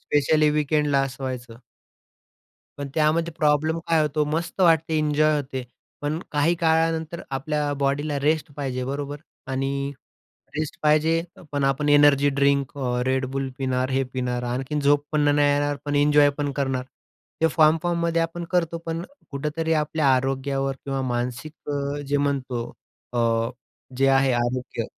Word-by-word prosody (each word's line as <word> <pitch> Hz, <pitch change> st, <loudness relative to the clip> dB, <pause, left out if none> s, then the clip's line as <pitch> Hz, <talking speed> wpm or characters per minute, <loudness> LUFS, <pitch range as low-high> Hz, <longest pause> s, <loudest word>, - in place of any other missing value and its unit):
Specially 150 Hz, +1 st, +2 dB
वीकेंडला 150 Hz, -1 st, +2 dB
असं 135 Hz, 0 st, -5 dB
व्हायचं. 125 Hz, -3 st, -5 dB, 1.2 s
पण, 140 Hz, -1 st, -4 dB
त्यामध्ये 165 Hz, +2 st, +2 dB
प्रॉब्लेम 155 Hz, +2 st, +2 dB
काय 165 Hz, -2 st, +3 dB
होतो, 150 Hz, 0 st, +1 dB
मस्त 165 Hz, +5 st, -2 dB
वाटते, 165 Hz, -2 st, +4 dB
एन्जॉय 155 Hz, 0 st, +2 dB
होते. 130 Hz, -3 st, -3 dB, 0.4 s
पण 150 Hz, +3 st, -1 dB
काही 150 Hz, +4 st, +2 dB
काळानंतर, 160 Hz, 0 st, +1 dB
आपल्या 145 Hz, +1 st, -1 dB
बॉडीला 140 Hz, +1 st, 0 dB
रेस्ट 150 Hz, +1 st, 0 dB
पाहिजे 130 Hz, -3 st, -3 dB
बरोबर? 145 Hz, +1 st, -4 dB, 0.3 s
आणि 140 Hz, +1 st, -2 dB, 0.7 s
रेस्ट 155 Hz, -1 st, -3 dB
पाहिजे, 155 Hz, +2 st, +3 dB, 0.3 s
पण 145 Hz, -1 st, 0 dB
आपण 135 Hz, +2 st, +1 dB
एनर्जी 145 Hz, -1 st, +5 dB
ड्रिंक 140 Hz, -1 st, +2 dB
अ, 125 Hz, -2 st, -1 dB
Red 130 Hz, 0 st, +1 dB
Bull 135 Hz, -1 st, -1 dB
पिणार, 130 Hz, 0 st, 0 dB
हे 135 Hz, +1 st, +1 dB
पिणार, 125 Hz, -1 st, -2 dB
आणखीन 135 Hz, +5 st, -2 dB
झोप 145 Hz, +1 st, +3 dB
पण 150 Hz, -, +2 dB
नाही 145 Hz, 0 st, +4 dB
येणार, 145 Hz, 0 st, +1 dB
पण 145 Hz, 0 st, -2 dB
एन्जॉय 145 Hz, 0 st, +5 dB
पण 145 Hz, -1 st, -1 dB
करणार. 135 Hz, -2 st, -1 dB, 0.6 s
ते 165 Hz, -, +5 dB
फॉर्म-फॉर्ममध्ये 165 Hz, +2 st, +2 dB
आपण 170 Hz, +1 st, -4 dB
करतो, 170 Hz, -2 st, 0 dB
पण 165 Hz, +1 st, -2 dB, 0.3 s
कुठेतरी, 150 Hz, +3 st, -2 dB
आपल्या 150 Hz, -1 st, 0 dB
आरोग्यावर 135 Hz, +1 st, -1 dB
किंवा 135 Hz, -1 st, -2 dB
मानसिक 125 Hz, +4 st, -3 dB, 0.2 s
अ, 140 Hz, 0 st, -2 dB
जे 145 Hz, +1 st, +1 dB
म्हणतो 135 Hz, -4 st, -1 dB, 0.5 s
अ, 115 Hz, -1 st, +1 dB, 0.5 s
जे 135 Hz, -, +3 dB
आहे 135 Hz, -1 st, +4 dB
आरोग्य 120 Hz, -1 st, -1 dB
145 Hz, 145 wpm, -24 LUFS, 135-155 Hz, 1.2 s, एनर्जी